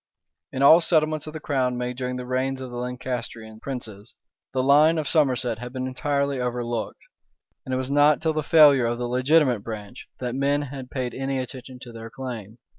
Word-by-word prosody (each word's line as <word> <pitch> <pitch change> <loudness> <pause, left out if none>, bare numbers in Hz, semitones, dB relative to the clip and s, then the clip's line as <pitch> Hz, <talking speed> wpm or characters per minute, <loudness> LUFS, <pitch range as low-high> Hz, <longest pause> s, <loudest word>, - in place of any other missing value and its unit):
[*] - - -62
In 135 +1 -1
all 160 +5 +8
settlements 155 -2 +1
of 155 - -7
the 155 - -5
crown 130 -4 -1
made 125 0 -3
during 125 0 -3
the 125 0 -5
reigns 130 +1 -1
of 130 -1 -7
the 120 - -6
Lancastrian 120 -3 -5
princes, 115 -5 -8 0.4
the 130 -1 0
line 150 +4 +5
of 155 -2 -2
Somerset 125 -7 +1
had 120 +1 -7
been 130 0 -4
entirely 140 +1 -1
overlooked; 120 -2 -3 0.6
and 130 - -4
it - - 0
was 130 +1 -3
not 145 +1 +5
till 160 0 0
the 155 - -1
failure 145 -5 +6
of 120 0 -1
the 120 0 -3
legitimate 130 0 +3
branch, 110 +1 -8
that 125 -2 -3
men 140 +2 +1
had 135 -2 -8
paid 125 -2 -3
any 135 0 -2
attention 130 0 -7
to 120 - -10
their 115 0 -9
claim. 120 -4 -7
130 Hz, 200 wpm, -24 LUFS, 120-140 Hz, 0.6 s, all